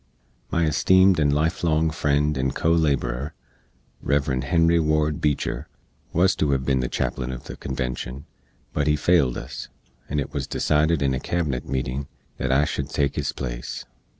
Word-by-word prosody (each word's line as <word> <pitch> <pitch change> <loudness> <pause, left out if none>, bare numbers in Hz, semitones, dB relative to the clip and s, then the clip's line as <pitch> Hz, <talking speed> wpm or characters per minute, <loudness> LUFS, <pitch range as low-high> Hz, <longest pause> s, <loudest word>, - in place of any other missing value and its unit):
My 85 - +1
esteemed 95 +4 +4
and 75 -2 +3
life 80 +4 0
long 80 -1 +2
friend 75 -1 +1
and 65 0 -1
co 80 - +1
laborer, 70 -4 0 0.7
Rev. 70 -2 +1
Henry 85 +5 +3
Ward 75 -1 +1
Beecher, 75 -2 -1 0.4
wuz 90 +3 +4
to 75 - +1
hev 65 -1 +1
bin 65 -2 +2
the 65 - 0
chaplin 65 -1 -2
uv 65 -1 -6
the - - -8
convenshun, 65 0 -4 0.5
but 75 -1 0
he 75 - +4
failed 75 -4 +3
us, - - -7 0.4
and 75 - 0
it 70 - -4
wuz 70 -2 -2
decided 75 0 +2
in 70 -1 +2
a 65 - -1
Cabinet 75 -9 -2
meetin 65 +1 -2 0.3
that 65 - -1
I 70 +3 +4
shood - - -3
take 70 -2 0
his - - -1
place. - - -5
75 Hz, 170 wpm, -24 LUFS, 65-80 Hz, 0.7 s, esteemed